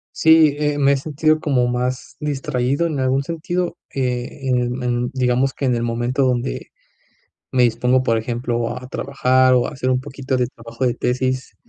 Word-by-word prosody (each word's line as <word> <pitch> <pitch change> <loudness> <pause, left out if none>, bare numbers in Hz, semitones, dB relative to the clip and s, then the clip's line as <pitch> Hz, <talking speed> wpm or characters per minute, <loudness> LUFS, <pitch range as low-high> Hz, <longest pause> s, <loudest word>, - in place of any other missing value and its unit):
Sí, 160 -2 +5
eh, 150 -1 0
me 140 0 +4
he - - +1
sentido 155 +2 +1
como 135 -5 +1
más 125 +2 -3
distraído 140 +1 -1
en 150 -4 -3
algún 130 +1 +1
sentido, 170 +2 -3 0.2
eh, 130 +1 -3
en 125 0 0
en, 120 0 0
digamos 130 +1 +1
que 140 - -3
en 125 -2 +2
el 115 - -1
momento 120 +3 0
donde 125 0 -1 0.8
me 125 -2 +3
dispongo, 125 +2 +2
por 115 -3 +2
ejemplo, 120 +1 -2
a 125 0 -9
trabajar, 130 -1 +2
o 125 -1 +3
a - - -6
hacer 130 -3 -2
un 130 0 +1
poquito 130 0 -3
de 125 - +1
trabajo 115 +1 -5
de 120 - +1
tesis. 130 +1 -2
130 Hz, 180 wpm, -20 LUFS, 125-140 Hz, 0.8 s, Sí